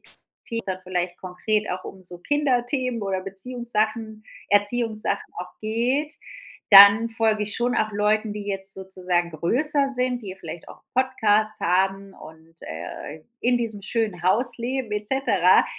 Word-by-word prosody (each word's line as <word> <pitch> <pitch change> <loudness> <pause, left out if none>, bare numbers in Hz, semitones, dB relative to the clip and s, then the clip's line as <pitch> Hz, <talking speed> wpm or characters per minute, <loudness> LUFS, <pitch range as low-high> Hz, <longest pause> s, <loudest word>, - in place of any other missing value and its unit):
Themen, - - -21 0.5
wo's - - -21
dann 185 -1 -4
vielleicht 180 -1 -3
konkret 210 +4 -2
auch 185 0 -4
um 190 - -10
so 180 -1 -9
Kinderthemen 255 0 0
oder 195 -2 -2
Beziehungssachen 220 +1 -2 0.2
Erziehungssachen 215 +2 +1
auch 180 0 -7
geht, 250 +8 -1 0.6
dann 200 +3 +10
folge 220 -1 +1
ich 210 - -3
schon 245 +1 0
auch 215 - +1
Leuten, 210 +1 +1
die 210 0 -6
jetzt 195 -1 -1
sozusagen 180 -2 -2
größer 275 - +1
sind, 250 -1 -1
die 190 -3 -7
vielleicht 165 -2 -9
auch - - -14
Podcasts 215 -5 +2
haben 195 +2 0
und, 160 +1 -15
äh, 85 - -8 0.2
in 245 0 +2
diesem 225 -4 -3
schönen 215 -4 -2
Haus 230 +7 +2
leben 245 -1 -3
et 210 0 -3
cetera, 200 -9 +4
210 Hz, 150 wpm, -24 LUFS, 185-240 Hz, 0.6 s, dann